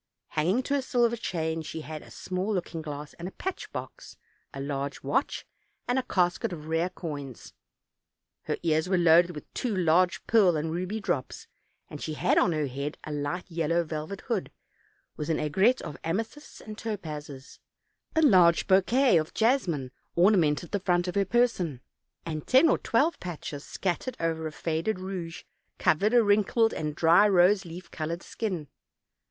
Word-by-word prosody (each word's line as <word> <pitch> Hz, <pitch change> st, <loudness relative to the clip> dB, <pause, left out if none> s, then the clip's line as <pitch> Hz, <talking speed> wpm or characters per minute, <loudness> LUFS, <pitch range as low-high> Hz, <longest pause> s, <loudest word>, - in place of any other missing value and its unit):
Hanging 180 Hz, +11 st, +1 dB
to 280 Hz, -, -2 dB
a 285 Hz, -, +2 dB
silver 240 Hz, -2 st, +2 dB
chain, 160 Hz, -7 st, -2 dB
she 160 Hz, +1 st, -6 dB
had 155 Hz, 0 st, -7 dB
a -, -, -14 dB
small 185 Hz, +3 st, -3 dB
looking 170 Hz, -2 st, -3 dB
glass 150 Hz, -1 st, -7 dB
and 180 Hz, +3 st, -7 dB
patch 380 Hz, -, -5 dB
box, -, -, -8 dB, 0.3 s
a 135 Hz, -, -8 dB
large 140 Hz, 0 st, -4 dB
watch, 260 Hz, -, -1 dB, 0.4 s
and 245 Hz, +1 st, +2 dB
a -, -, +1 dB
casket 180 Hz, -7 st, 0 dB
of 155 Hz, -3 st, -7 dB
rare 165 Hz, +3 st, 0 dB
coins; 145 Hz, -, -7 dB, 0.9 s
her -, -, -1 dB
ears 160 Hz, +1 st, +1 dB
were 190 Hz, -, +3 dB
loaded 170 Hz, 0 st, +5 dB
with 150 Hz, -, -10 dB
two 240 Hz, -5 st, -2 dB
large 180 Hz, +1 st, +2 dB
pearl 195 Hz, -7 st, +4 dB
and 160 Hz, +1 st, -2 dB
ruby 185 Hz, +6 st, -3 dB
drops, 140 Hz, -10 st, -3 dB, 0.4 s
and 150 Hz, -, -9 dB
she 155 Hz, -, -4 dB
had -, -, +3 dB
on 180 Hz, -, +3 dB
her 155 Hz, -2 st, 0 dB
head 140 Hz, +3 st, -4 dB
a 155 Hz, -, -6 dB
light 145 Hz, +5 st, -3 dB
yellow 165 Hz, +1 st, +1 dB
velvet 155 Hz, +4 st, -5 dB
hood, 230 Hz, -7 st, -2 dB, 0.7 s
with 150 Hz, -, -4 dB
an 160 Hz, -, +2 dB
aigrette 190 Hz, -, +2 dB
of 145 Hz, -, -6 dB
amethysts 225 Hz, -, -4 dB
and 215 Hz, 0 st, -9 dB
topazes; 150 Hz, -10 st, -6 dB, 0.6 s
a 320 Hz, -, +4 dB
large 180 Hz, -, +6 dB
bouquet 200 Hz, +4 st, +4 dB
of 155 Hz, -, -5 dB
jasmine 185 Hz, -, +1 dB, 0.2 s
ornamented 170 Hz, -4 st, +3 dB
the 205 Hz, -, 0 dB
front 175 Hz, -1 st, +1 dB
of 180 Hz, -, -2 dB
her 200 Hz, +1 st, +2 dB
person, 190 Hz, -, +1 dB, 0.5 s
and 155 Hz, -3 st, -5 dB
ten 265 Hz, +6 st, +6 dB
or -, -, +2 dB
twelve 290 Hz, +9 st, +1 dB
patches, 155 Hz, -4 st, -6 dB
scattered 195 Hz, +7 st, -3 dB
over 160 Hz, -1 st, -1 dB
a -, -, -6 dB
faded 165 Hz, +6 st, -2 dB
rouge, 185 Hz, -3 st, -6 dB, 0.3 s
covered 210 Hz, +9 st, +2 dB
a 240 Hz, -, +6 dB
wrinkled 210 Hz, +2 st, +3 dB
and 150 Hz, -1 st, -3 dB
dry 170 Hz, +6 st, +5 dB
rose 190 Hz, +1 st, +4 dB
leaf 175 Hz, +2 st, -9 dB
colored 165 Hz, +2 st, -4 dB
skin. 185 Hz, -9 st, -4 dB
175 Hz, 170 wpm, -28 LUFS, 155-205 Hz, 0.9 s, large